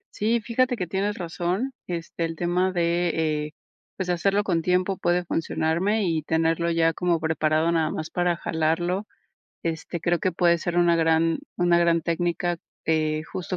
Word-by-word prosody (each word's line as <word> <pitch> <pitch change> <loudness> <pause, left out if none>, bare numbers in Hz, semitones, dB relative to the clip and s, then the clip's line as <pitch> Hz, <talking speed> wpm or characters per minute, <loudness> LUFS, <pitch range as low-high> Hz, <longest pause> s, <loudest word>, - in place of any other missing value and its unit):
Sí, 225 +2 +1
fíjate 245 +3 +1
que, 185 -6 -3
tienes 200 +4 -1
razón, 180 +8 -2 0.2
este, 170 -1 -3
el 165 0 -4
tema 180 +2 0
de, 170 0 +1 0.4
eh, - - -13 0.4
pues, 190 - -3
de 180 - +2
hacerlo 195 +4 +1
con 175 -5 0
tiempo 180 +2 +1
puede 175 +1 +1
funcionarme 170 +5 0
y 165 -3 0
tenerlo 165 +2 +1
ya 165 -1 +3
como 175 0 0
preparado 160 +1 +1
nada 160 -2 +1
más 155 0 -4
para 175 -1 +1
jalarlo, 170 +5 -1 0.6
este, 165 +1 -3
creo 170 +1 +1
que 185 +3 0
puede 170 0 +3
ser 175 +1 -3
una 170 -1 +4
gran 165 0 +2 0.2
una 175 -1 +3
gran 170 -1 +3
técnica, 175 +1 -1 0.3
eh, 155 -1 +1
justo 185 +3 -5
170 Hz, 170 wpm, -25 LUFS, 165-180 Hz, 0.6 s, una